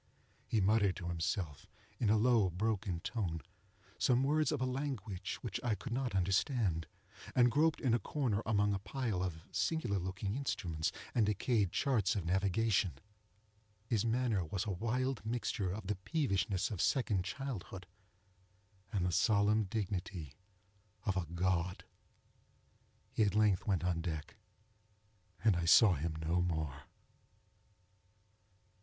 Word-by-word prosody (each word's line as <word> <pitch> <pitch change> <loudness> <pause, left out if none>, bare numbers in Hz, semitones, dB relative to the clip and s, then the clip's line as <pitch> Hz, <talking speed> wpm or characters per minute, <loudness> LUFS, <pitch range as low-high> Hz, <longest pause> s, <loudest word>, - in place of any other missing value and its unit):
He 110 - +1
muttered 100 -1 +3
to 85 -3 -5
himself, 85 -3 -2 0.3
in 110 - +2
a 110 - +5
low 115 -3 +4
broken 95 -1 -1
tone, 85 -9 -2 0.6
some 125 +1 +3
words 155 +3 +2
of 150 - -1
a 130 - 0
language 125 -8 -3
which 120 0 -3
I 120 -4 +1
could 125 +3 -6
not 125 -4 -1
understand, 95 - +1 0.5
and 125 -1 +5
groped 155 +3 +3
in 125 -4 +1
a 120 - +3
corner 115 -2 -1
among 105 -1 +2
a 100 - -1
pile 105 -1 -2
of 80 -4 -3
singular 120 -12 0
looking 95 +2 -3
instruments, 90 - -2 0.2
and 110 -4 +3
decayed 105 -2 +1
charts 115 -8 +1
of 95 -5 -2
navigation. 95 0 +2 0.9
His 110 -3 +1
manner 115 -4 +1
was 90 +6 -3
a 105 - -2
wild 120 +6 -1
mixture 110 -4 -1
of 100 +3 -5
the 105 0 -2
peevishness 100 - 0
of 100 - -2
second 105 -8 +1
childhood, 100 -4 -5 1.1
and 95 -4 0
the 90 - +1
solemn 105 +3 +3
dignity 95 -6 -4 0.7
of 95 - +1
a 90 -4 -1
God. 90 +1 -1 1.3
He - - 0
at 105 -2 +3
length 105 -3 +3
went 95 -4 +1
on 90 -2 0
deck, 80 -3 -4 1.1
and 110 -5 +5
I 85 -1 -1
saw 95 +4 +7
him 80 +1 -2
no 80 +3 0
more. 80 -5 -2
100 Hz, 140 wpm, -35 LUFS, 90-115 Hz, 1.3 s, saw